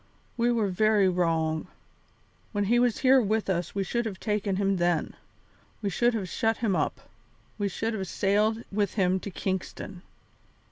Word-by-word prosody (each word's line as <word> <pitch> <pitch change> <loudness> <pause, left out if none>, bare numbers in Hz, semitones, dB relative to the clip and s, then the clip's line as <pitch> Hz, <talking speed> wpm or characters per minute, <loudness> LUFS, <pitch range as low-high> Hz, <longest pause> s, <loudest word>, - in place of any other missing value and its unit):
we 240 0 +2
were 225 -3 +1
very 210 +1 +3
wrong. 165 -3 0 0.9
When 205 -1 +1
he 235 +4 +3
was 245 -2 +2
here 260 0 +7
with 215 -2 0
us 175 0 -2
we 200 - +1
should 235 +5 -1
have 195 -3 -6
taken 210 -2 -1
him 195 0 +1
then; 175 -2 +1 0.7
we 200 -2 -2
should 240 +6 +2
have 200 -4 -2
shut 225 +5 0
him 215 -5 0
up; - - -1 0.6
we 205 - +1
should 225 +4 -2
have 195 -3 -3
sailed 210 +5 +1
with 205 -1 0
him 190 -2 +2
to 200 - -6
Kingston." 190 0 -4
200 Hz, 170 wpm, -27 LUFS, 185-220 Hz, 0.9 s, here